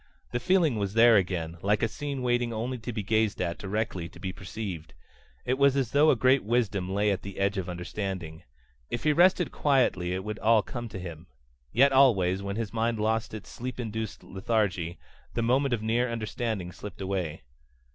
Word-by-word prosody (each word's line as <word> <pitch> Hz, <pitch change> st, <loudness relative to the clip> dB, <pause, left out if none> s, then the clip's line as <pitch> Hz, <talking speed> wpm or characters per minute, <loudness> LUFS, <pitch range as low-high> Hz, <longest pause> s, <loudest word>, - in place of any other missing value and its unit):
The 120 Hz, -, -1 dB
feeling 160 Hz, -, +2 dB
was 100 Hz, 0 st, -2 dB
there 115 Hz, 0 st, +7 dB
again, 85 Hz, -4 st, 0 dB
like 105 Hz, +3 st, +1 dB
a -, -, +4 dB
scene 140 Hz, +2 st, -5 dB
waiting 120 Hz, -1 st, +1 dB
only 120 Hz, +3 st, -3 dB
to 120 Hz, +2 st, -5 dB
be 110 Hz, -3 st, -3 dB
gazed 110 Hz, +1 st, +1 dB
at 85 Hz, -2 st, -2 dB
directly 95 Hz, -4 st, -3 dB
to 85 Hz, -, -15 dB
be 95 Hz, 0 st, -4 dB
perceived. 95 Hz, -6 st, -7 dB, 0.5 s
It 130 Hz, +2 st, 0 dB
was 140 Hz, -1 st, +5 dB
as 130 Hz, -4 st, 0 dB
though 150 Hz, +2 st, +5 dB
a -, -, +5 dB
great 130 Hz, +3 st, +3 dB
wisdom 105 Hz, -5 st, 0 dB
lay 100 Hz, +1 st, +2 dB
at 95 Hz, -, -1 dB
the 100 Hz, -1 st, -8 dB
edge 100 Hz, +1 st, +1 dB
of 90 Hz, -, -4 dB
understanding. 90 Hz, -2 st, -5 dB, 0.5 s
If 120 Hz, -, -3 dB
he 150 Hz, -, +4 dB
rested 180 Hz, +2 st, +4 dB
quietly 125 Hz, -11 st, +2 dB
it 95 Hz, -, -4 dB
would 105 Hz, +1 st, -5 dB
all 110 Hz, -1 st, +4 dB
come 120 Hz, +1 st, -6 dB
to 100 Hz, -, -7 dB
him. 85 Hz, -2 st, -8 dB, 0.4 s
Yet 135 Hz, +3 st, +5 dB
always, 100 Hz, -9 st, +4 dB
when 100 Hz, 0 st, -4 dB
his 115 Hz, -1 st, -3 dB
mind 115 Hz, 0 st, 0 dB
lost 110 Hz, +1 st, 0 dB
its 105 Hz, -, -9 dB
sleep 125 Hz, +1 st, -6 dB
induced 110 Hz, -2 st, -4 dB
lethargy, 95 Hz, -4 st, -1 dB, 0.4 s
the 115 Hz, -, 0 dB
moment 130 Hz, +4 st, +2 dB
of 115 Hz, -3 st, -1 dB
near 120 Hz, +3 st, +1 dB
understanding 110 Hz, -4 st, -3 dB
slipped 100 Hz, +1 st, -9 dB
away. 95 Hz, -6 st, -3 dB
110 Hz, 195 wpm, -28 LUFS, 95-120 Hz, 0.5 s, there